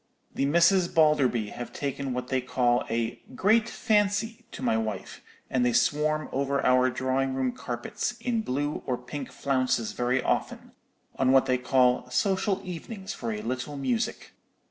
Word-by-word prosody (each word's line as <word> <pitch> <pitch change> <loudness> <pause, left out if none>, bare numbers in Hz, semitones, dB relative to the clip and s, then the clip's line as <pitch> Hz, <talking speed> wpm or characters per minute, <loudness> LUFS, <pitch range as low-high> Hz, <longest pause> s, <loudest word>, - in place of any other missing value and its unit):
The 140 - 0
Misses 170 +4 +4
Balderby 145 -10 +3
have 120 - -7
taken 140 -1 -3
what 125 0 -4
they 130 -1 +1
call 125 -1 +1
a 115 0 -2
'great 220 - +3
fancy' 215 +1 0
to - - -8
my - - +2
wife, 110 -3 -4 0.3
and 125 - +1
they 125 -1 +2
swarm 155 +3 +1
over 140 +1 0
our 130 0 +4
drawing 130 +1 -1
room 130 -1 0
carpets 120 - -4
in 235 -3 -1
blue 145 -4 -2
or 125 -2 0
pink 135 +2 -7
flounces 130 -4 0
very 125 +1 0
often, - - -2 0.5
on 130 0 +3
what 135 0 +5
they 125 -1 +1
call 125 -1 +2
'social 190 - +1
evenings 190 +3 -6
for 115 -2 -4
a 105 -1 -4
little 130 +5 -4
music.' 130 -4 -2
130 Hz, 160 wpm, -27 LUFS, 125-160 Hz, 0.5 s, what